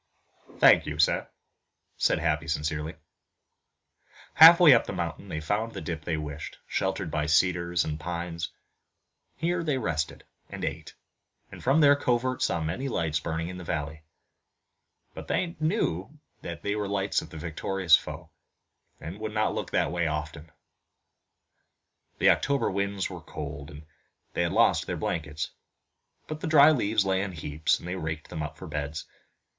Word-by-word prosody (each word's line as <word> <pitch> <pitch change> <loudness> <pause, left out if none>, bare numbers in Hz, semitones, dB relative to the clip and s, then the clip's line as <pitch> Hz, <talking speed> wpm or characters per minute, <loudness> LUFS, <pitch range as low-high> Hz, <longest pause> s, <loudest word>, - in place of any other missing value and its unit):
"Thank - - +6
you, 75 -1 -4
sir," 80 - +2 0.7
said - - +2
Happy 75 +1 0
sincerely. 75 +1 -2 1.4
Half 165 +2 +10
way 165 -6 +9
up 115 - +3
the - - -4
mountain 85 +3 -4
they 80 - -3
found 105 +8 -2
the 100 - -5
dip 80 -1 -5
they 80 -2 -1
wished, 75 -1 -6
sheltered 95 -3 -2
by 75 0 -1
cedars 85 +2 +2
and 75 0 -4
pines. 85 0 -4 0.8
Here 170 +3 -1
they 150 -4 0
rested 80 -10 -2 0.3
and - - -5
ate, - - -5 0.6
and - - -11
from 140 +5 +4
their 145 -1 +7
covert 130 -1 0
saw 85 - +1
many 105 +13 -3
lights 80 -8 -1
burning 80 +2 -3
in 90 - -7
the - - -8
valley. 80 -1 -4 1.1
But - - -9
they 175 -1 -1
knew 155 - -1 0.2
they 85 +5 -4
were 105 -1 -2
the 100 - -4
lights 95 0 0
of - - -11
the 80 - -10
victorious 85 +2 +2
foe, - - -6 0.7
and 80 - -7
they 100 - -13
would 110 0 -5
not 105 0 +1
look - - -4
that - - +1
way 85 -1 0
often. 75 +1 -5 1.7
The - - +5
October 140 -1 +1
winds 100 0 -1
were 90 -3 -8
cold, 70 -1 -7
and 75 +2 -11 0.5
they - - 0
had - - 0
lost - - +3
their - - -3
blankets, 80 -1 -3 0.8
but 155 0 -5
the - - -3
dry 155 -1 +7
leaves 110 -7 +1
lay 95 -1 +1
in 95 -2 -4
heaps, 75 -1 0
and - - -10
they 90 - -3
raked 80 -3 -5
them 80 - -4
up 75 +1 -5
for 95 - -9
beds. 75 -1 -4
85 Hz, 165 wpm, -27 LUFS, 80-105 Hz, 1.7 s, Half